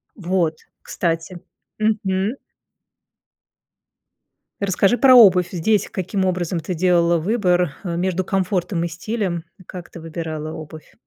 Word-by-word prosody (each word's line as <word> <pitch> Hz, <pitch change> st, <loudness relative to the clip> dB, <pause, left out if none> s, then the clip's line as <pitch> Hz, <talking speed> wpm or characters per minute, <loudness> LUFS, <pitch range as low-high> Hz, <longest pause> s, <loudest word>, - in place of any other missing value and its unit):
Вот. 175 Hz, -4 st, -1 dB, 0.2 s
Кстати. 165 Hz, -2 st, -2 dB, 0.5 s
Мгм. 210 Hz, 0 st, 0 dB, 2.2 s
Расскажи 200 Hz, +3 st, +2 dB
про 260 Hz, -1 st, +7 dB
обувь 185 Hz, -7 st, +7 dB
здесь, 200 Hz, +4 st, +1 dB
каким 190 Hz, +1 st, -2 dB
образом 180 Hz, -1 st, -1 dB
ты 165 Hz, +3 st, -4 dB
делала 170 Hz, 0 st, +3 dB
выбор, 180 Hz, -3 st, +1 dB
э, 175 Hz, -3 st, -3 dB
между 185 Hz, +1 st, -1 dB
комфортом 185 Hz, -2 st, -1 dB
и -, -, -1 dB
стилем? 175 Hz, 0 st, -3 dB, 0.2 s
И -, -, -15 dB
как 180 Hz, -1 st, -10 dB
ты -, -, -11 dB
выбирала 160 Hz, -1 st, -5 dB
обувь? 155 Hz, -1 st, -10 dB
180 Hz, 120 wpm, -21 LUFS, 170-195 Hz, 2.2 s, про